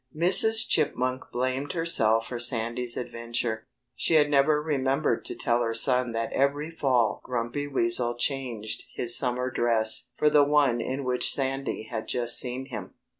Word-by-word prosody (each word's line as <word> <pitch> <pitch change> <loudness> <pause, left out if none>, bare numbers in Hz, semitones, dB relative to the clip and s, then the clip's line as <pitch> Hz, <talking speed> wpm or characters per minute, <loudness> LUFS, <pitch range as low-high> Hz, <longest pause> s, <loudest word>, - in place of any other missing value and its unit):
Mrs. 220 +6 +5
Chipmunk 130 +1 -1
blamed 130 +3 -3
herself 115 -10 +2
for 120 - -5
Sandy's 120 0 0
adventure. 115 -2 -4 0.3
She 165 - 0
had 150 -1 +3
never 145 +2 +3
remembered 135 -4 -1
to - - -3
tell 120 0 0
her 115 -1 -2
son 125 +1 +2
that 115 0 -3
every 145 +3 -1
fall 130 -8 0
Grumpy 125 +4 -4
Weasel 120 -2 +2
changed 120 -4 -3
his 120 -1 +2
summer 125 0 0
dress 115 -2 +1
for 150 - +1
the 145 -1 +5
one 140 -5 +2
in 135 +4 -4
which 125 -1 +2
Sandy 135 -3 -2
had 110 0 -7
just 120 -1 +2
seen 125 +1 -4
him. 110 -5 -8
125 Hz, 155 wpm, -26 LUFS, 120-140 Hz, 0.3 s, Mrs